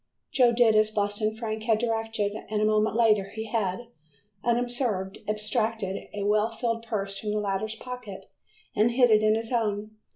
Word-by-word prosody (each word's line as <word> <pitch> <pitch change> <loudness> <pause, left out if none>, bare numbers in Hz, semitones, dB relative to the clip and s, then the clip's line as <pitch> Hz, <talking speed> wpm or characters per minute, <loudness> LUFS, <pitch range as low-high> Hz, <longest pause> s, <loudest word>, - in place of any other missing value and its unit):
Joe 250 -3 +5
did 235 -2 +4
as 215 0 +4
Boston 215 +1 0
Frank 220 -1 -4
had 225 -2 +3
directed, 225 -2 -1 0.2
and 215 0 -1
a 215 - +2
moment 215 0 +2
later 215 -4 +4
he 220 - -3
had, 220 0 -2 0.5
unobserved, 240 -5 0
abstracted 215 -2 -1
a 205 -1 -4
well 210 +2 +2
filled 230 0 -2
purse 200 -3 -3
from 215 - -4
the 210 - 0
latter's 205 +2 -2
pocket 245 -4 -8 0.5
and 215 +3 +4
hid 245 0 +4
it 215 0 +6
in 215 0 +4
his 225 +1 -3
own. 215 -3 -1
215 Hz, 170 wpm, -27 LUFS, 210-230 Hz, 0.5 s, it